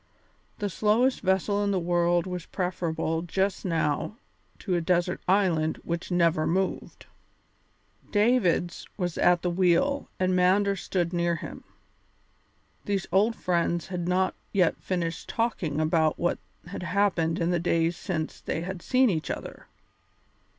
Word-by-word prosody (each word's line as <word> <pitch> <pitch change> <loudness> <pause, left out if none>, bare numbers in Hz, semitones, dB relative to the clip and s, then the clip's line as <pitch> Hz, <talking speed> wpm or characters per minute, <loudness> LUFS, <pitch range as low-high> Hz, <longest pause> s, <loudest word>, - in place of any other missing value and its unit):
The 205 - -2
slowest 220 +7 +2
vessel 195 +2 +1
in 205 - 0
the 195 -2 +1
world 175 0 +1
was 180 -2 -5
preferable 165 -3 -2
just 190 +3 -1
now 165 +3 -1 0.4
to 190 - -3
a 175 - +1
desert 175 +1 0
island 180 -5 +2
which 170 0 -4
never 170 -3 +2
moved. 190 +3 -2 1.0
Davids 205 -6 +1
was 175 -4 -2
at 175 -1 +4
the 180 - 0
wheel 190 +11 +2
and 185 0 +2
Mander 195 +2 +3
stood 180 -2 -2
near 170 0 +1
him. - - -8 1.2
These 200 -2 -1
old 210 +5 +3
friends 170 -2 -1
had 175 -2 -3
not 185 +1 +1 0.2
yet 180 -5 +3
finished 170 -2 -3
talking 195 -10 -1
about 155 0 +2
what 175 - 0 0.3
had 180 +2 -7
happened 180 -3 +1
in 170 +1 0
the 175 - +1
days 165 0 +1
since 160 -3 -4
they 160 - -3
had 185 +1 -5
seen 255 +5 +3
each 165 -8 -1
other. - - -6
180 Hz, 140 wpm, -27 LUFS, 170-195 Hz, 1.2 s, at